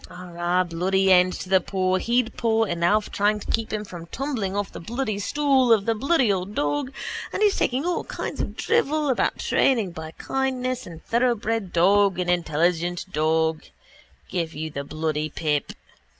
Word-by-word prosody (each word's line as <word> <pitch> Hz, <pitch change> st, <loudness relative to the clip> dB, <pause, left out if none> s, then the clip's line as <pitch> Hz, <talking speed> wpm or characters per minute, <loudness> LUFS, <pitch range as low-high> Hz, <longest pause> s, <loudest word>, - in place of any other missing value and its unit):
Arrah, 175 Hz, 0 st, -1 dB
bloody 190 Hz, +3 st, +1 dB
end 180 Hz, 0 st, +6 dB
to -, -, -6 dB
the 190 Hz, 0 st, +4 dB
paw 185 Hz, 0 st, 0 dB
he'd 235 Hz, +3 st, 0 dB
paw 225 Hz, -1 st, +2 dB
and 170 Hz, -5 st, -2 dB
Alf 210 Hz, +4 st, +2 dB
trying 210 Hz, +1 st, +1 dB
to -, -, -5 dB
keep 225 Hz, -1 st, -1 dB
him 215 Hz, 0 st, -3 dB
from 175 Hz, -4 st, -9 dB
tumbling 230 Hz, -4 st, -3 dB
off 205 Hz, -1 st, -2 dB
the -, -, -8 dB
bloody 220 Hz, +2 st, -3 dB
stool 270 Hz, +2 st, +2 dB
atop 220 Hz, -3 st, +6 dB
of -, -, -14 dB
the 230 Hz, -, +2 dB
bloody 260 Hz, -1 st, +2 dB
old 190 Hz, +2 st, -4 dB
dog 145 Hz, -, -1 dB, 0.4 s
and -, -, -1 dB
he 415 Hz, -, +5 dB
talking 260 Hz, -4 st, 0 dB
all 355 Hz, -1 st, 0 dB
kinds -, -, -4 dB
of -, -, -5 dB
drivel 310 Hz, -10 st, +1 dB
about 260 Hz, -, +1 dB
training 225 Hz, -9 st, +2 dB
by 160 Hz, -1 st, -7 dB
kindness 255 Hz, -1 st, -2 dB
and 165 Hz, -2 st, -11 dB
thoroughbred 225 Hz, -4 st, 0 dB
dog 195 Hz, +2 st, +4 dB
and 180 Hz, -1 st, 0 dB
intelligent 175 Hz, +1 st, 0 dB
dog: 160 Hz, +1 st, +1 dB, 0.7 s
give 165 Hz, -3 st, -3 dB
you 155 Hz, +1 st, -4 dB
the 140 Hz, -1 st, -4 dB
bloody 155 Hz, +1 st, -2 dB
pip. 150 Hz, -2 st, -1 dB
195 Hz, 180 wpm, -24 LUFS, 170-235 Hz, 0.7 s, end